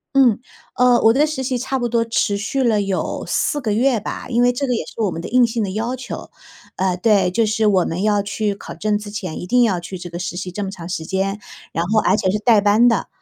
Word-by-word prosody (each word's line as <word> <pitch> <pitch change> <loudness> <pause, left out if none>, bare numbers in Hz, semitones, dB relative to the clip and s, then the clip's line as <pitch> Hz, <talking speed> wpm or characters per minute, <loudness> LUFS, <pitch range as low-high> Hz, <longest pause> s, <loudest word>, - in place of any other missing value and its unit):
嗯， 250 -6 +5 0.4
呃， 250 -1 +4
我 225 - +6
的 280 +6 +3
实 305 -3 -3
习 260 -1 -1
差 265 +2 -2
不 240 -1 -1
多 230 0 +1
持 225 -3 0
续 225 +7 -2
了 225 -4 +2
有 195 -1 -3
4 295 - 0
个 220 -6 -1
月 240 +2 +2
吧， 210 - -6
因 240 -1 +2
为 245 0 +3
这 275 +3 -2
个 250 - +1
也 - - -3
是 - - -12
我 210 - +2
们 165 - -5
的 170 - -6
硬 250 0 +4
性 230 -1 -2
的 195 - -3
要 230 +5 -2
求。 255 - -7 0.5
呃， 185 -1 0
对， 195 -2 +3
就 220 +4 +1
是 220 +1 +1
我 195 -4 +4
们 175 +4 -3
要 210 -1 +2
去 205 +1 -2
考 195 - -10
证 215 0 0
之 210 0 -8
前， 190 -5 -5
一 180 - -7
定 245 +4 +4
要 195 -6 +1
去 180 +2 -7
这 175 -1 -9
个 170 - -5
实 175 0 -4
习 185 0 -5
这 205 +3 -4
么 195 - -3
长 180 -4 -8
时 175 -3 -4
间， 195 +4 -2 0.3
然 165 - -1
后 215 +4 +2
而 190 - +3
且 190 - 0
是 200 - +1
带 215 -1 +4
班 210 +4 +4
的， 230 -4 +1
210 Hz, 285 characters per minute, -20 LUFS, 190-240 Hz, 0.5 s, 我